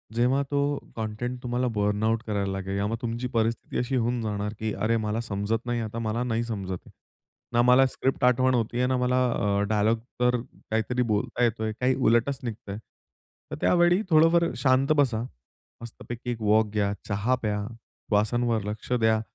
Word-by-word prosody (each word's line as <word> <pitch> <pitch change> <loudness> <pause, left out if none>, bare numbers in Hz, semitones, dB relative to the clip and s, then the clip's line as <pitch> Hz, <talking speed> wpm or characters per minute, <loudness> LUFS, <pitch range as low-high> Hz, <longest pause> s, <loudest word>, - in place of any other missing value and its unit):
जेव्हा 125 +4 +3
तो 145 - +1 0.4
कंटेंट 115 +3 -4
तुम्हाला 125 +1 0
बर्नआउट 105 +2 +1
करायला 100 -2 -1
लागेल, 95 0 -4
त्यामुळे 105 +3 -1
तुमची 120 +1 -3
परिस्थिती 115 -1 -1
अशी 125 +2 -1
होऊन 120 0 0
जाणार, 105 -1 -3
की 110 -1 -2
"अरे, 115 +2 +1
मला 110 0 -1
समजत 110 +1 -2
नाही, 120 -1 -1
आता 110 +1 -4
मला 115 +1 -1
नाही 115 -1 -1
समजत. 95 -6 -5 0.7
ना 120 - +4
मला 125 +2 +6
स्क्रिप्ट 130 0 -2
आठवण 130 +1 +4
होते 120 -1 0
आहे, 125 0 +2
ना 130 - +1
मला 125 0 +1 0.2
अ, 100 -3 0
डायलॉग 110 +1 +2 0.2
तर 125 0 +3 0.3
काहीतरी 110 +3 0
बोलता 105 +3 0
येतो 115 -1 +1
आहे. 110 0 -1
काही 125 +1 +2
उलटच 130 +2 +2
निघत 115 -2 -6
आहे." 100 - -4 0.7
तर - - -2
त्यावेळी 175 +2 +4
थोडंफार 165 +1 +5
शांत 130 +1 +3
बसा, 125 -6 +2 0.6
मस्तपैकी 120 +1 -7
एक 115 - -5
वॉक 110 +1 +4
घ्या, 100 -1 +1
चहा 105 +5 +1
प्या, 105 -2 -1 0.5
श्वासांवर 110 +1 +1
लक्ष 105 +3 -6
द्या, 110 -1 +3
115 Hz, 170 wpm, -26 LUFS, 105-125 Hz, 0.7 s, मला